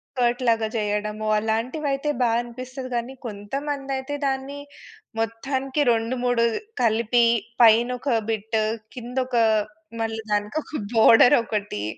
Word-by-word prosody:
skirt 245 0 +1
లాగా 225 -1 +2
చేయడము 210 0 -2
అలాంటివి 230 +8 -1
అయితే 275 +2 -1
బా 240 - +3
అనిపిస్తది 255 +2 -8
గానీ 240 +3 -3
కొంతమంది 270 +7 -4
అయితే 265 +2 -4
దాన్ని 270 +1 -2 0.6
మొత్తానికి 265 +5 -2
రెండు 230 +2 0
మూడు 245 -1 +2 0.4
కలిపి 235 +1 +3 0.4
పైన 230 +2 +6
ఒక 245 -5 +1
బిట్ 220 0 -1 0.4
కింద 245 +1 -7
ఒక 245 -2 -1 0.6
మళ్ళీ 225 0 -2
దానికొక 215 +7 -2
బోర్డర్ 225 +2 +7
ఒకటి 205 - -3
235 Hz, 120 wpm, -24 LUFS, 220-265 Hz, 0.6 s, బోర్డర్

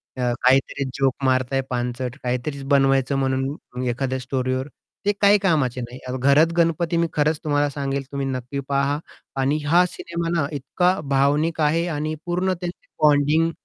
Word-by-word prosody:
त्या 125 -2 0
काहीतरी 135 +1 +2
जोक 135 -2 +3
मारताय 130 +1 +1
पानचट, 125 0 -3
काहीतरी 125 +3 -3
बनवायचं 135 0 +3
म्हणून 130 -1 -2
एखाद्या 130 +2 -2
स्टोरीवर 130 0 -2 0.4
ते 205 - +4
काही 200 +1 +6
कामाचे 150 -10 +1
नाही. 120 +2 -8
अ, - - -3
घरत 140 +5 +4
गणपती 170 0 +2
मी 170 0 +2
खरंच 150 +1 +1
तुम्हाला 145 -1 +1
सांगेल 140 -1 -3
तुम्ही 140 -1 -2
नक्की 130 +1 -4
पहा 140 +1 +1 0.4
आणि 140 +3 +1
हा 175 +4 +5
सिनेमा 170 -1 -4
ना, 140 - 0
इतका 180 +7 0
भावनिक 145 +4 +2
आहे 160 +3 +2
आणि 155 -1 -2
पूर्ण 180 +2 0
त्यांची 175 0 -6 0.2
बॉन्डिंग 150 +2 +4
140 Hz, 155 wpm, -22 LUFS, 130-160 Hz, 0.4 s, काही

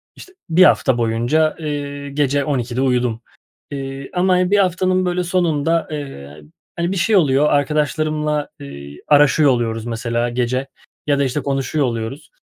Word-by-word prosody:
işte 375 - -14 0.2
1 175 +3 +5
hafta 130 -8 +4
boyunca, 120 +8 +1
eee, 145 -2 -5
gece 140 0 0
12'de 125 -3 -2
uyudum, 125 -3 0 0.5
eee, 135 -1 -6
ama 180 0 +2
1 205 - +4
haftanın, 185 0 +1
böyle, 180 0 0
sonunda, 165 -2 0
eee, 75 - -8 0.3
hani, 170 +1 -1
bir 195 - -2
şey 210 +6 +2
oluyor, 150 -5 +3
arkadaşlarımla, 150 +1 0
eee, 70 +1 -10
araşıyor 145 0 +5
oluyoruz 115 -2 -1
mesela 120 +1 -2
gece 125 +2 -1 0.4
ya 145 -1 +2
da, 140 - +3
işte, 135 +2 -1
konuşuyor 135 +1 -1
oluyoruz. 120 +8 -4
145 Hz, 145 wpm, -19 LUFS, 125-160 Hz, 0.5 s, 1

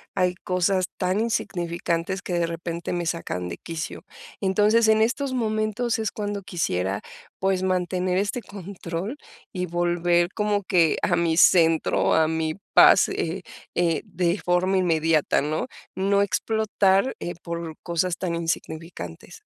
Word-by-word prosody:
hay 180 -1 +1
cosas 185 +1 0
tan 185 +2 0
insignificantes 175 -4 -2
que 180 - -5
de 170 -1 +1
repente 170 +1 -4
me 175 -1 -2
sacan 90 - -3
de 85 - -6
quicio. 165 +3 -6 0.4
Entonces, 210 +4 +3
en 220 0 +4
estos 260 +4 0
momentos 220 0 0
es 220 - -1
cuando 205 -2 -4
quisiera, 100 - -1 0.4
pues, 190 -1 +1
mantener 185 0 0
este 205 +5 -1
control 195 - -6 0.3
y 180 -1 -2
volver 175 0 +1
como 210 -1 0
que 175 -4 +3
a - - +2
mi 170 -1 +1
centro, 165 -2 +4
a 160 -1 +3
mi 160 -1 -1 0.2
paz, - - +7
eh, 170 +4 -3 0.3
eh, 170 -3 +1
de 175 +2 -1
forma 180 +3 +1
inmediata, 165 -3 +2
¿no?, 155 - -2 0.3
no 200 +1 +2
explotar, 205 +1 +1
eh, 175 - -4
por 170 -1 -5
cosas 170 0 -1
tan 175 -2 -2
insignificantes. 165 - -5
180 Hz, 140 wpm, -24 LUFS, 165-200 Hz, 0.4 s, paz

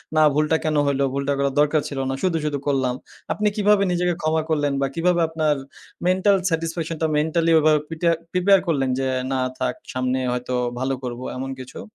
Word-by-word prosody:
না 155 - +5
ভুলটা 150 +2 +2
কেন 155 -1 0
হইল, 140 -1 0
ভুলটা 140 +1 0
করার 140 -1 0
দরকার 150 0 +3
ছিল 140 -2 -5
না। - - -1
শুধু, 180 -3 +1
শুধু 145 -1 -1
করলাম। 130 -3 +1 0.4
আপনি 210 - 0
কিভাবে 210 -1 +3
নিজেকে 175 0 +1
ক্ষমা 155 0 +1
করলেন 145 -2 +1
বা 135 - +2
কিভাবে 175 +1 +2
আপনার 155 -2 +1 0.5
মেন্টাল 190 +2 +4
স্যাটিসফ্যাকশন 165 0 -2
টা 160 - +2
মেন্টালি 165 +2 +1
ওভাবে 155 0 +4
প্রিটা 165 +1 0 0.2
প্রিপেয়ার 190 +2 +4
করলেন 135 -5 +1
যে, 135 - 0 0.3
না 130 - 0 0.2
থাক 125 -1 -1 0.2
সামনে 130 0 0
হয়তো 125 +1 -3 0.3
ভালো 135 +1 -1
করব 120 -1 -5 0.2
এমন 135 +1 -4
কিছু। 130 0 -10
155 Hz, 185 wpm, -22 LUFS, 135-165 Hz, 0.5 s, না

